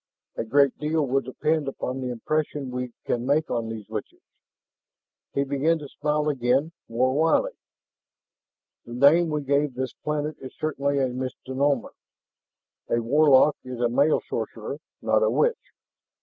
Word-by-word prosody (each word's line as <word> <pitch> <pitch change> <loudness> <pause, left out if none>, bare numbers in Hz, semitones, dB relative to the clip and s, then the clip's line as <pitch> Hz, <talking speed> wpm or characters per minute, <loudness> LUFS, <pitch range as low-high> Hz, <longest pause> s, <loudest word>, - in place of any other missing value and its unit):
A - - -2
great 140 +4 +3
deal 155 0 +1
will 135 +1 +1
depend 150 +4 -1
upon 130 -1 -4
the 125 - -3
impression 145 +2 -2
we 125 -1 -4
can 120 - -1
make 145 +4 +1
on 115 -1 -1
these 110 -2 -7
witches." 110 -1 -7 1.1
He 140 - +2
began 140 +4 +1
to 150 -2 -8
smile 150 +1 -1
again, 135 +2 +1 0.2
more 125 +3 +1
wryly. 160 +3 +2 1.3
"The 120 - -10
name 155 +6 +5
we 150 -1 -1
gave 140 -1 +1
this 130 0 -3
planet 150 0 -3
is 130 - -10
certainly 140 -2 -1
a 135 -2 +2
misnomer. 130 +1 -2 1.0
A 120 - +2
warlock 145 +4 +5
is 130 -1 -7
a 120 -1 +2
male 140 +6 +3
sorcerer, - - -4 0.2
not - - +3
a - - +3
witch." 475 0 0
140 Hz, 150 wpm, -25 LUFS, 125-150 Hz, 1.3 s, name